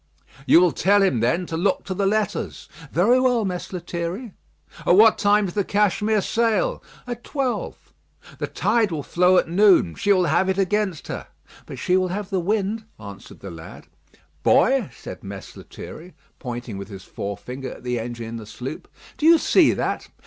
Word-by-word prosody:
"You - - +7
will 180 -1 +4
tell 200 +5 +3
him, 160 -12 +2
then, 165 +11 +1
to 165 - -5
look 185 +3 0
to 190 - -4
the 195 +1 0
letters." 215 0 -2 0.2
"Very 225 +10 +4
well, 250 -4 +2
Mess 180 -2 -4
Lethierry." 175 +4 -5 0.5
"At 175 - +4
what 220 +2 +6
time 205 0 +3
does 175 - -5
the 205 - 0
Cashmere 210 +1 +1
sail?" 230 - 0 0.2
"At 240 -1 -6
twelve." 270 -4 -4 0.5
"The - - -2
tide 225 -5 +1
will 150 -3 -3
flow 180 +5 +3
at - - +2
noon; 180 - +4
she 205 - 0
will 185 -2 +4
have 175 +5 +2
it 190 - 0
against 195 -3 -1
her." - - -6 0.4
"But - - -8
she 180 - +1
will 185 0 +1
have 200 +2 -5
the 190 - +1
wind," 210 +4 -1
answered 100 -1 -11
the - - -8
lad. 80 -1 -11 0.6
"Boy," 255 - +3
said - - -10
Mess 95 -1 -9
Lethierry, 160 - -11 0.2
pointing 120 -5 -6
with 100 - -7
his 95 -3 -10
forefinger 125 +9 -6
at - - -14
the 125 -1 -2
engine 120 0 -6
in 115 +1 -6
the 110 -2 -9
sloop, 125 +7 -7 0.3
"do 305 - +3
you 335 0 +8
see - - +4
that? - - -2
185 Hz, 185 wpm, -23 LUFS, 130-210 Hz, 0.6 s, you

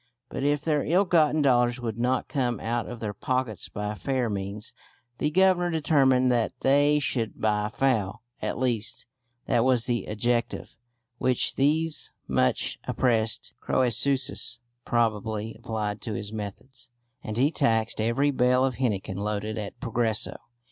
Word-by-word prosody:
But - - -4
if 145 0 +1
their 150 -2 +1
ill 185 +5 +3
gotten 155 -3 +3
dollars 120 -2 +3
would 115 -2 -4
not 125 +1 0
come 125 -6 -1
out 115 +1 -2
of 120 - -7
their 105 -2 -3
pockets 125 0 -2
by 105 0 -4
fair 125 +1 -1
means, 100 +2 -5 0.5
the 150 - +1
Governor 180 +1 +3
determined 135 -5 +3
that 120 -2 +1
they 145 +2 +4
should 125 -6 -1
by 105 -1 +1
foul 115 -5 0 0.2
(at - - -2
least, 120 -2 -1 0.4
that 115 - +2
was 125 -2 +3
the 120 -5 -1
adjective 120 +3 -1 0.4
which 125 -1 +2
these 155 +3 +1
much 65 0 +1
oppressed 115 -3 0
Crœsuses 130 +3 +1 0.3
probably 110 -1 0
applied 110 -3 -4
to 110 - -4
his 105 +2 -5
methods), 125 +5 -8 0.3
and 110 0 -5
he 140 +5 +3
taxed 115 -8 +1
every 120 +6 +2
bale 125 0 +3
of 130 -2 -2
henequen 105 -6 -1
loaded 105 +1 -2
at 105 -2 -7
Progreso. 115 -3 0
120 Hz, 145 wpm, -26 LUFS, 110-135 Hz, 0.5 s, they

